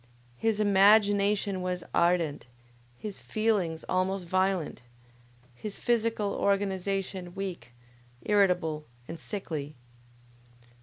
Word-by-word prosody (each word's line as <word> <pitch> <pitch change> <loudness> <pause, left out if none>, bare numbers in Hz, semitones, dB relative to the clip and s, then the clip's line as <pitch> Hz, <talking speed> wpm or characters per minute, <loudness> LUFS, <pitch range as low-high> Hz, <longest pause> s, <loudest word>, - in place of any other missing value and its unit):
His 220 -2 +1
imagination 205 -1 +4
was 180 -1 -3
ardent, 170 -6 +1 0.5
his 210 - -6
feelings 205 -7 -1
almost 185 0 0
violent, 185 -4 0 0.7
his 200 - -7
physical 230 -4 0
organization 195 -2 -1
weak, 190 -9 -5 0.5
irritable 180 -7 +2 0.2
and 165 0 -7
sickly. 155 -8 -5
195 Hz, 85 wpm, -29 LUFS, 175-205 Hz, 0.7 s, imagination